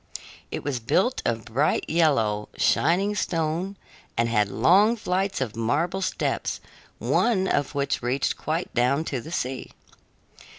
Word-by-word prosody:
It - - -5
was 135 -3 -2
built 190 - +1
of 115 -1 -1
bright 135 +7 0
yellow, 115 -11 +2
shining 185 +7 +2
stone 170 +1 -1 0.4
and 115 0 +2
had 105 -3 +2
long 205 - +4
flights 195 - -1
of 115 -5 -2
marble 155 +12 0
steps, 185 - -1 0.4
one 195 -6 +1
of 145 -3 0
which 140 -1 0
reached 125 +3 0
quite 160 +4 -3
down 130 +5 +2
to 130 -6 -3
the 160 - -10
sea. 130 -6 -3
150 Hz, 135 wpm, -25 LUFS, 120-185 Hz, 0.4 s, long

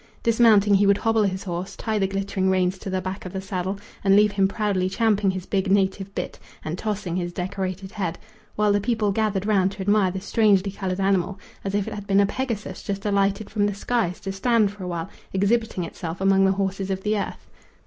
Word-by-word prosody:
Dismounting, 220 -3 +5
he 200 0 +5
would 200 0 +5
hobble 225 0 +2
his 195 -1 0
horse, 185 +1 -4
tie 220 -2 -2
the 195 - +2
glittering 195 -1 -1
reins 185 0 +1
to 195 - -6
the 185 0 -1
back 185 +1 -5
of 185 - -8
the 190 - -2
saddle, 190 0 -3 0.3
and 195 0 +5
leave 210 0 +5
him 195 -1 +2
proudly 195 -3 0
champing 210 -1 +2
his 185 -1 -3
big 190 -1 0
native 195 0 +1
bit - - -4 0.3
and 155 - -2
tossing 200 -3 -3
his 175 -1 -2
decorated 190 +1 -4
head, 180 -5 -3 0.4
while 210 0 +3
the 205 - +2
people 220 -2 +1
gathered 205 -2 0
round 195 -3 +3
to 195 - -8
admire 205 0 +3
the 190 +1 -4
strangely 200 -1 +2
coloured 190 -1 -3
animal 195 0 +1 0.2
as 195 0 -2
if 205 -1 0
it - - -4
had 205 -1 -7
been 195 0 +4
a 200 - +5
Pegasus 230 -1 -4
just 200 0 -4
alighted 200 0 +1
from 205 -1 +1
the 205 - -2
skies 205 -4 -1
to 195 - -4
stand 215 +1 +2
for 205 -2 -10
a - - -4
while 170 -2 -3 0.3
exhibiting 200 0 +1
itself 165 0 -6
among 195 0 +4
the 190 - +4
horses 195 0 -2
of 190 0 -2
the 215 0 +1
earth. 205 - -4
195 Hz, 220 wpm, -24 LUFS, 190-205 Hz, 0.4 s, Dismounting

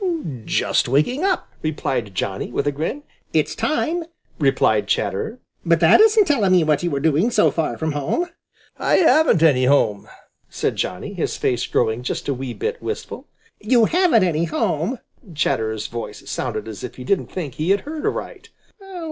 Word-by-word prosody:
"Just - - +1
waking 200 - +1
up," 380 -2 0
replied 125 -9 -2
Johnny, 95 +5 -3
with 140 - -1
a 145 - +2
grin. 160 - -4 0.3
"It's - - +1
time," 330 +2 -1 0.4
replied 125 -7 +2
Chatterer. 105 - -1 0.3
"But 170 -2 +3
that 165 -1 +6
isn't 435 -1 +5
telling 220 - +2
me 180 -2 +5
what 150 -2 +1
you 175 -4 -1
are - - 0
doing 160 - +2
so 215 -3 +3
far 150 -8 -2
from 160 0 -2
home." 145 - -1 0.5
"I - - +2
haven't 315 - +4
any 130 -6 +4
home," 125 -7 +2 0.4
said - - -2
Johnny, - - -3
his - - -2
face 125 -1 0
growing 115 0 0
just 125 - -4
a 140 - +1
wee 130 -1 -5
bit 470 +2 -3
wistful. 435 - -6 0.3
"You 230 +1 +3
haven't 340 - +3
any 170 -2 +1
home!" 165 - -1 0.4
Chatterer's 110 -7 -1
voice 115 0 -7
sounded - - -3
as 105 -4 -8
if 125 - -6
he 125 - -9
didn't 195 +8 0
think 160 -9 -5
he 155 +6 -3
had 200 +1 +3
heard 305 +1 -6
aright. - - -4
155 Hz, 175 wpm, -21 LUFS, -, 0.5 s, that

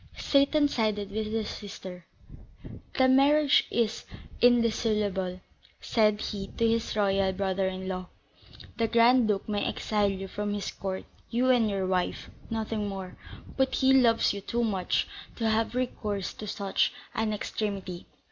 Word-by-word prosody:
Seyton 290 +1 +3
sided 215 -6 -1
with 215 +1 -2
his 220 0 -2
sister. 185 -4 -8 0.9
"The 260 - +5
marriage 280 +2 +4
is 225 -2 -1 0.4
indissoluble," 215 -6 +2 0.4
said 215 -2 +2
he 195 -2 -4
to 230 - +3
his 225 -1 0
royal 195 -2 +2
brother 190 0 0
in 185 0 -4
law; 185 -1 -4 0.7
"the 230 - +1
Grand 235 +1 +5
Duke 200 -2 -1
may 205 -1 -1
exile 210 -2 0
you 195 0 -4
from 205 +1 -3
his 205 - -3
court, 190 -1 -5 0.2
you 250 +2 +2
and 235 -4 +3
your 195 -2 -1
wife, 185 -1 -1 0.2
nothing 220 -2 -2
more; 190 -2 -6 0.4
but 265 -1 +2
he 265 0 +4
loves 235 -5 +4
you 200 - -5
too 235 +4 -1
much 195 -5 0 0.3
to 225 - -1
have 220 +2 +1
recourse 210 -6 -2
to 215 - -8
such 200 -1 0 0.2
an 220 -1 0
extremity. 200 -4 -4
210 Hz, 145 wpm, -28 LUFS, 195-230 Hz, 0.9 s, The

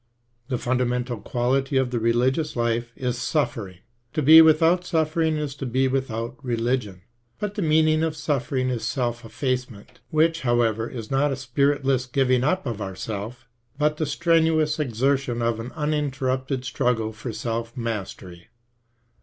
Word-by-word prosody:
The 125 -2 -1
fundamental 125 -1 -1
quality 135 +4 0
of 130 -2 +1
the 120 - 0
religious 125 +7 +1
life 120 0 -1
is 125 -1 -2
suffering. 120 - -2 0.3
To 155 -1 0
be 160 +4 +10
without 160 +3 +4
suffering 160 -1 0
is 150 -2 -3
to 135 - -4
be 130 +2 +1
with 135 0 -1
out 115 +5 -5
religion. 115 -6 -2 0.3
But 210 -1 -3
the 210 - -3
meaning 155 -1 +3
of 160 -1 0
suffering 135 -4 -1
is 120 -3 -3
self 120 -3 -2
effacement, 125 -2 -4
which, 165 +2 +2
however, 120 -2 +1
is 115 -3 -7
not 140 +2 +2
a - - -1
spiritless 135 0 0
giving 130 -1 +2
up 185 +6 0
of 115 -4 -4
ourself, 105 +5 -6 0.3
but 150 +1 +1
the 155 - -1
strenuous 160 0 +2
exertion 130 -1 0
of 115 -1 0
an 120 +3 -6
uninterrupted 135 -3 -1
struggle 115 -4 0
for 110 +3 -6
self 115 +2 -4
mastery. 95 -6 -5
130 Hz, 150 wpm, -24 LUFS, 120-150 Hz, 0.3 s, be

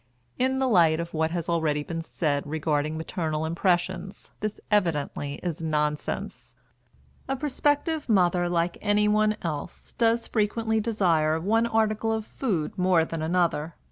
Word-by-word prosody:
In 260 +1 +2
the 265 0 +1
light 165 -8 +4
of 170 0 -5
what 160 0 +1
has 170 -1 -3
already 160 -3 0
been 165 +2 -4
said 150 -3 -2
regarding 155 0 -1
maternal 160 -1 -2
impressions, 180 +2 -1
this 215 0 -3
evidently 150 -7 0
is 170 -3 -3
nonsense. 150 -2 -2 0.7
A 270 - 0
prospective 290 +2 0
mother, 180 -4 +3
like 170 0 0
anyone 210 +1 +2
else, 165 +1 -5
does 230 0 +2
frequently 220 +1 0
desire 170 -8 +2
one 225 +7 +2
article 220 0 +1
of 220 -1 -2
food 190 - -2
more 180 -3 +4
than 165 -1 -5
another. 165 -1 0
175 Hz, 140 wpm, -26 LUFS, 160-215 Hz, 0.7 s, light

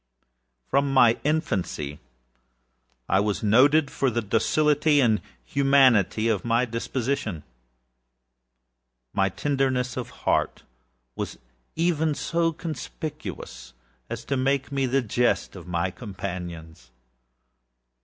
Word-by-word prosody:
From 140 0 +1
my 120 -4 +5
infancy 95 - -1 1.1
I 95 - +3
was 105 +1 -1
noted 140 +7 +4
for 135 - +1
the 120 -1 -1
docility 150 +7 +2
and 110 -5 +3 0.2
humanity 130 - +3
of 110 -5 0
my 115 +1 +2
disposition. 115 - -3 1.7
My 95 -1 +2
tenderness 130 +1 -1
of - - -4 0.2
heart - - +1 0.5
was - - -5 0.4
even 160 -2 +1
so 165 +2 0
conspicuous 145 - -7 0.3
as - - -6
to 140 - -1
make 135 +1 0
me 135 -1 0
the 135 +1 +1
jest 120 +2 0
of - - -10
my 90 +1 -1
companions. 90 - -7
125 Hz, 105 wpm, -25 LUFS, 100-140 Hz, 1.7 s, my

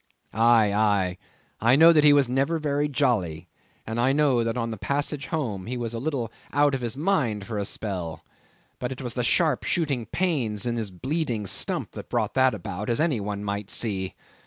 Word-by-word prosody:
Aye, 115 -2 +4
aye, 100 -4 +1 0.4
I 120 +4 +4
know 165 +3 +8
that 150 -2 +4
he 150 - +8
was 140 -2 +4
never 135 +6 +1
very 145 -1 0
jolly; 105 - 0 0.4
and 110 +1 -3
I 130 +3 +3
know 140 -5 +3
that 115 +1 -2
on 115 -1 -2
the 110 - -5
passage 145 +4 -2
home, 110 - -3
he 125 +1 -3
was 120 -1 -3
a 115 - -3
little 130 -5 -2 0.2
out 145 0 +3
of 135 - -1
his 120 +2 -4
mind 140 - 0
for 110 -1 -4
a 100 - -2
spell; 90 -7 -5 0.5
but 125 - -3
it 130 0 -6
was 120 -2 -4
the 125 - -1
sharp 155 +2 +2
shooting 140 -9 -1
pains 125 - -1
in 120 -1 -1
his 110 -3 -3
bleeding 125 - -2
stump - - 0
that - - -9
brought - - -1
that 130 -1 +3
about, 100 +1 -5
as 120 - 0
any 155 -7 +1
one 100 0 -4
might 100 0 -3
see. 95 -5 -2
120 Hz, 205 wpm, -25 LUFS, 105-145 Hz, 0.5 s, know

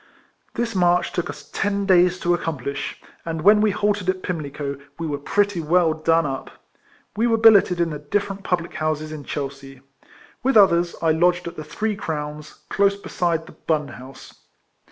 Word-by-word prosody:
This 235 -1 -2
march 180 -2 +2
took 175 -1 -3
us - - -9
ten 200 0 -1
days 180 -1 +4
to 175 - +2
accomplish, 140 -5 -4 0.2
and 165 -2 -4
when 210 +2 +6
we 215 - +4
halted 205 -2 0
at 185 0 -1
Pimlico, 145 -4 -4 0.2
we 165 - -4
were 145 -2 -3
pretty 200 +4 0
well 165 +1 +3
done 165 +1 +2
up. 135 -2 -4 0.7
We 225 +3 +2
were 225 -1 +2
billeted 205 -5 +5
in 170 -1 +1
the 150 - -5
different 195 +6 -2
public 175 -2 -2
houses 155 0 -2
in 150 -2 -8
Chelsea. 135 -2 -6 0.6
With 265 -2 +3
others, 175 -4 +4
I 160 - +4
lodged 175 +2 +2
at 170 - -7
the 155 - -6
Three 210 +8 -3
Crowns, 150 -3 -6
close 200 0 +2
beside 170 -4 -2
the - - -13
Bun 150 -3 -2
House. 130 +2 -12
170 Hz, 175 wpm, -22 LUFS, 150-195 Hz, 0.7 s, when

